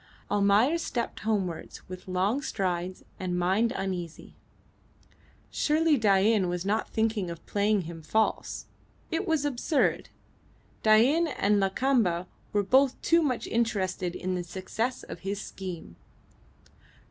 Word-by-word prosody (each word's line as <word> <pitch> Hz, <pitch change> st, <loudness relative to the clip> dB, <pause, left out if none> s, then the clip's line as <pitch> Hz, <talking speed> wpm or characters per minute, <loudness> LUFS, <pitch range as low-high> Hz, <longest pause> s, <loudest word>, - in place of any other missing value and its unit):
Almayer 205 Hz, +10 st, +4 dB
stepped 240 Hz, -7 st, -3 dB
homewards 195 Hz, -6 st, -3 dB
with 185 Hz, 0 st, -9 dB
long 190 Hz, +8 st, 0 dB
strides 185 Hz, -6 st, -2 dB, 0.2 s
and 180 Hz, -1 st, -2 dB
mind 190 Hz, +6 st, +2 dB
uneasy. 185 Hz, -7 st, -5 dB, 1.2 s
Surely 315 Hz, +1 st, +3 dB
Dain 205 Hz, -3 st, +3 dB
was 175 Hz, +1 st, -3 dB
not 210 Hz, +2 st, 0 dB
thinking 220 Hz, -4 st, 0 dB
of 170 Hz, -1 st, -8 dB
playing 205 Hz, 0 st, +1 dB
him 165 Hz, -1 st, -8 dB
false. 220 Hz, +8 st, -1 dB, 0.5 s
It 360 Hz, +5 st, -1 dB
was 320 Hz, -3 st, +1 dB
absurd. 285 Hz, +2 st, 0 dB, 0.7 s
Dain 250 Hz, +10 st, +5 dB
and 210 Hz, -8 st, +1 dB
Lakamba 195 Hz, -3 st, +1 dB, 0.3 s
were 205 Hz, -1 st, +2 dB
both 265 Hz, +5 st, +3 dB
too 335 Hz, 0 st, +4 dB
much 260 Hz, -6 st, -1 dB
interested 195 Hz, -6 st, -1 dB
in 185 Hz, 0 st, -2 dB
the 180 Hz, -1 st, -2 dB
success 210 Hz, +8 st, -3 dB
of -, -, -8 dB
his 195 Hz, +1 st, -3 dB
scheme. 180 Hz, -, -7 dB
205 Hz, 125 wpm, -28 LUFS, 185-240 Hz, 1.2 s, Dain